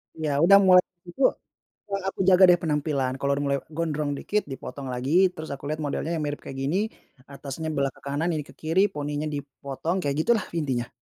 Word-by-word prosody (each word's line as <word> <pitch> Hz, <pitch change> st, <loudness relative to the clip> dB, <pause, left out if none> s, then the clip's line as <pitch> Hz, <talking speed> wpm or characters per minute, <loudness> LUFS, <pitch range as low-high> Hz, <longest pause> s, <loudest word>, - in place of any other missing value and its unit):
Iya 155 Hz, -2 st, -2 dB
udah 195 Hz, +3 st, +8 dB
mulai 180 Hz, 0 st, +8 dB, 0.3 s
itu, 220 Hz, +10 st, -9 dB, 0.7 s
yang 195 Hz, 0 st, -1 dB
aku -, -, -12 dB
jaga 185 Hz, 0 st, +6 dB
dari 175 Hz, -, +6 dB
penampilan 150 Hz, -4 st, 0 dB
kalau 140 Hz, 0 st, 0 dB
udah 140 Hz, +1 st, -1 dB
mulai 140 Hz, 0 st, +1 dB, 0.2 s
gondrong 155 Hz, -3 st, -1 dB
dikit 210 Hz, 0 st, 0 dB
dipotong 135 Hz, +1 st, -7 dB
lagi 125 Hz, +3 st, -3 dB, 0.2 s
terus 160 Hz, -1 st, -8 dB
aku 140 Hz, -, -9 dB
lihat 155 Hz, -, -1 dB
modelnya 150 Hz, +3 st, -2 dB
yang 155 Hz, -, -2 dB
mirip 145 Hz, 0 st, -3 dB
kayak 135 Hz, -, -8 dB
gini, 145 Hz, +7 st, 0 dB, 0.5 s
atasnya 140 Hz, +3 st, -6 dB
belah 140 Hz, -1 st, +1 dB
ke -, -, -20 dB
kanan 145 Hz, +5 st, -1 dB
ini 155 Hz, -2 st, -2 dB
ke -, -, -14 dB
kiri 165 Hz, +4 st, +2 dB
poninya 145 Hz, +1 st, -3 dB
dipotong 140 Hz, +4 st, -4 dB
kayak 140 Hz, -4 st, -1 dB
gitulah 225 Hz, +3 st, +2 dB
intinya. 130 Hz, -6 st, -2 dB
150 Hz, 195 wpm, -25 LUFS, 140-165 Hz, 0.7 s, udah